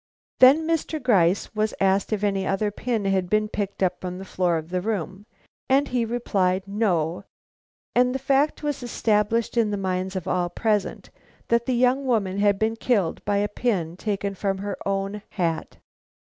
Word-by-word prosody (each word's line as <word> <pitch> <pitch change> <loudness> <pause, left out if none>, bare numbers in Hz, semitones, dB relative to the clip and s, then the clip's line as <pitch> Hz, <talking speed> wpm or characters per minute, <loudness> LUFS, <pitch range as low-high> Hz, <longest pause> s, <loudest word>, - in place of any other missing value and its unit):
Then 275 +5 +7
Mr. 325 -1 -1
Gryce 200 - +2
was 215 0 -1
asked 195 +1 +2
if 210 -1 -1
any 195 -2 0
other 205 +2 0
pin 225 -1 -2
had 190 -2 +1
been 215 +1 +2
picked 200 -2 -3
up 180 -1 0
from 180 -1 -5
the 190 - -8
floor 180 -3 0
of 160 +1 -6
the 180 0 0
room, 200 -1 -4 0.4
and 275 +2 +3
he 245 -2 0
replied, 195 -5 0
no; 185 -4 0 0.7
and 250 +1 +3
the - - +2
fact 275 +3 +1
was 290 -2 -2
established 225 -1 0
in 225 -2 +3
the 205 - -2
minds 190 0 -2
of 185 - -4
all 175 -1 0
present 210 +1 -1 0.4
that 235 0 +2
the 255 - +1
young 255 +3 +2
woman 200 -6 0
had 205 -1 +3
been 220 +2 0
killed 210 -8 0
by 205 0 +1
a 205 +1 +1
pin 200 -7 -1
taken 200 +1 -2
from 195 0 -2
her 200 0 -4
own 195 +1 -2
hat. 170 -4 -2
205 Hz, 180 wpm, -24 LUFS, 190-235 Hz, 0.7 s, Then